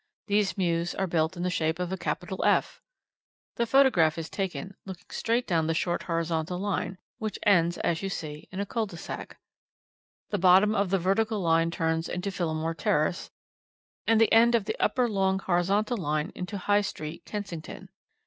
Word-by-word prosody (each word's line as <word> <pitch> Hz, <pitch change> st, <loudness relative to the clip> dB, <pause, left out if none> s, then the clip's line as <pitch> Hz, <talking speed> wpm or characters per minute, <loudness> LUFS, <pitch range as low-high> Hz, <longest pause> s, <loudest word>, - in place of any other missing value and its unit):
These 205 Hz, -3 st, +1 dB
mews 170 Hz, -2 st, 0 dB
are 195 Hz, -, 0 dB
built 165 Hz, 0 st, 0 dB
in 175 Hz, -, -3 dB
the 180 Hz, -, 0 dB
shape 160 Hz, -2 st, 0 dB
of 180 Hz, 0 st, -3 dB
a -, -, 0 dB
capital 185 Hz, 0 st, -3 dB
F. -, -, +2 dB, 0.8 s
The 235 Hz, -, +1 dB
photograph 225 Hz, -, +4 dB
is 165 Hz, -1 st, -5 dB
taken 195 Hz, 0 st, -4 dB
looking 190 Hz, -2 st, -9 dB
straight 235 Hz, +2 st, 0 dB
down 165 Hz, -3 st, +1 dB
the 165 Hz, -, 0 dB
short 175 Hz, +1 st, 0 dB
horizontal 165 Hz, 0 st, -2 dB
line, 195 Hz, -1 st, -2 dB, 0.2 s
which 215 Hz, -1 st, -3 dB
ends, 175 Hz, -4 st, +4 dB
as 165 Hz, -1 st, -1 dB
you 195 Hz, -, -2 dB
see, 150 Hz, -5 st, -6 dB
in 190 Hz, -, -5 dB
a 200 Hz, -, -1 dB
cul 225 Hz, +1 st, -2 dB
de 175 Hz, -4 st, -10 dB
sac. -, -, -7 dB, 0.9 s
The 205 Hz, -, 0 dB
bottom 190 Hz, +4 st, +6 dB
of 200 Hz, -3 st, +1 dB
the 195 Hz, -, +2 dB
vertical 205 Hz, +4 st, +1 dB
line 165 Hz, -2 st, +2 dB
turns 165 Hz, -1 st, -1 dB
into 180 Hz, +3 st, -3 dB
Phillimore 165 Hz, -3 st, -2 dB
Terrace, 155 Hz, +3 st, 0 dB, 0.8 s
and 225 Hz, -1 st, +4 dB
the 225 Hz, -, +4 dB
end 235 Hz, +1 st, +6 dB
of 220 Hz, -4 st, +1 dB
the -, -, -2 dB
upper 250 Hz, -2 st, +2 dB
long 190 Hz, -3 st, +1 dB
horizontal 195 Hz, +5 st, +1 dB
line 155 Hz, -2 st, -1 dB
into 185 Hz, +3 st, -5 dB
High 205 Hz, +2 st, +2 dB
Street, 155 Hz, -5 st, -6 dB
Kensington. 195 Hz, -2 st, -6 dB
185 Hz, 180 wpm, -28 LUFS, 165-205 Hz, 0.9 s, bottom